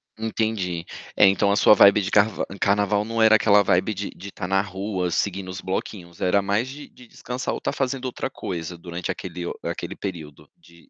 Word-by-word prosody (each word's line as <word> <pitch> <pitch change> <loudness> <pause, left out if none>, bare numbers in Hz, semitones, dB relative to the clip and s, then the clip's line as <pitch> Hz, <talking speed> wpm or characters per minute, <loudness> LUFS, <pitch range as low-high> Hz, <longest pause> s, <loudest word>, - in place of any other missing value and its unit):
Entendi. 110 -6 -2 0.3
É, 100 - +6
então 100 +1 +3
a - - +3
sua 105 - +6
vibe 100 +1 +6
de 95 - -3
carva 105 +1 +2
em 100 - -8
carnaval 100 +1 +2
não 115 +1 -2
era 110 0 +7
aquela 105 -1 +5
vibe 95 +3 +1
de 100 +1 -5
de 100 +3 -10
estar 95 -1 -6
na 95 +1 +2
rua, 95 -2 -3
seguindo 95 +2 -2
os 95 +1 -6
bloquinhos, 95 -2 -5
era 95 +2 +3
mais 100 +5 0
de 145 +2 -9
de 125 - -17
descansar 125 +2 -5
ou - - -3
estar - - -2
fazendo 135 -1 -2
outra 130 +1 -3
coisa 85 -8 -6
durante 85 0 -5
aquele 90 -2 -6
o - - -3
aquele - - -4
período 75 -6 -8
de 85 -1 -21
100 Hz, 210 wpm, -23 LUFS, 90-110 Hz, 0.3 s, era